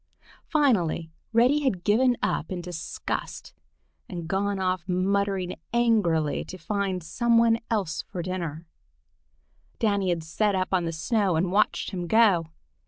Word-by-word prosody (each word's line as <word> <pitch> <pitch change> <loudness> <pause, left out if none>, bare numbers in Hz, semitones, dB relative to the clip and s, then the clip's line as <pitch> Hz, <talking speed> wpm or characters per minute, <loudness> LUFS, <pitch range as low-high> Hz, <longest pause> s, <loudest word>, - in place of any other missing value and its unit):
Finally 185 - +1 0.2
Reddy 245 +6 +4
had 255 -12 -1
given 245 +4 +3
up 160 - -1
in 185 - -3
disgust 175 -2 -5 0.6
and 170 -3 -6
gone 200 +2 0
off 185 -1 -1
muttering 190 0 0 0.2
angrily 205 -11 +2
to 185 - -9
try 175 - -23
to - - -27
find 195 -4 -1
something 230 +5 +3
else 195 -7 -1
for 175 - -6
dinner. 170 -3 -4 1.1
Danny 200 -5 +1
had 170 -2 -1
sat 200 +5 0
up 185 0 0
on 180 -2 +2
the 165 - -2
snow 185 +3 0
and 175 +3 0
watched 210 +1 +1
him 180 -3 -4
go. 200 -6 +4
190 Hz, 145 wpm, -26 LUFS, 175-220 Hz, 1.1 s, Reddy